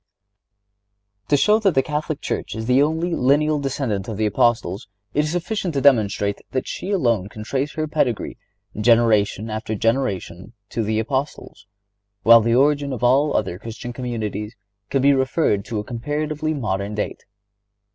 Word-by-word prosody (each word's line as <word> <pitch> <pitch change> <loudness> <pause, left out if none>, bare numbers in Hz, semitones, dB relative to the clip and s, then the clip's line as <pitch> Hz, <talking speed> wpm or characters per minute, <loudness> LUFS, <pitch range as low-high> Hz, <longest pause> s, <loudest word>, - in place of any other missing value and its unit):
To 145 - +3
show 210 +10 +4
that 195 -6 +2
the 135 - +4
Catholic 150 0 -3
Church - - -3
is 110 0 -4
the 125 +3 +4
only 160 +4 0
lineal 150 +3 +2
descendant 130 -8 -2
of 110 -3 -5
the 110 - +1
Apostles 105 -2 +1 0.3
it 150 +1 +2
is 150 - -2
sufficient 175 -1 -2
to - - +2
demonstrate 105 -6 +2
that 130 - -1
she 190 - -5
alone 120 - +1
can 105 0 -9
trace 135 +5 -2
her 155 0 -2
pedigree, 140 -7 -1 0.4
generation 110 -2 +3
after 110 0 -3
generation, 110 -4 -2 0.2
to 115 - -2
the 110 0 -1
Apostles, 130 -3 -3 0.6
while 115 +1 +8
the 115 +1 +2
origin 145 +1 +2
of 125 - -6
all 135 +5 +3
other 95 -4 -2
Christian 115 +3 -7
communities 115 -3 -4 0.3
can 135 -1 0
be 140 0 +6
referred 130 -5 +1
to 115 - -4
a 105 - -2
comparatively 150 +6 -3
modern 100 -5 -2
date. 105 - -4
125 Hz, 160 wpm, -22 LUFS, 110-145 Hz, 0.6 s, while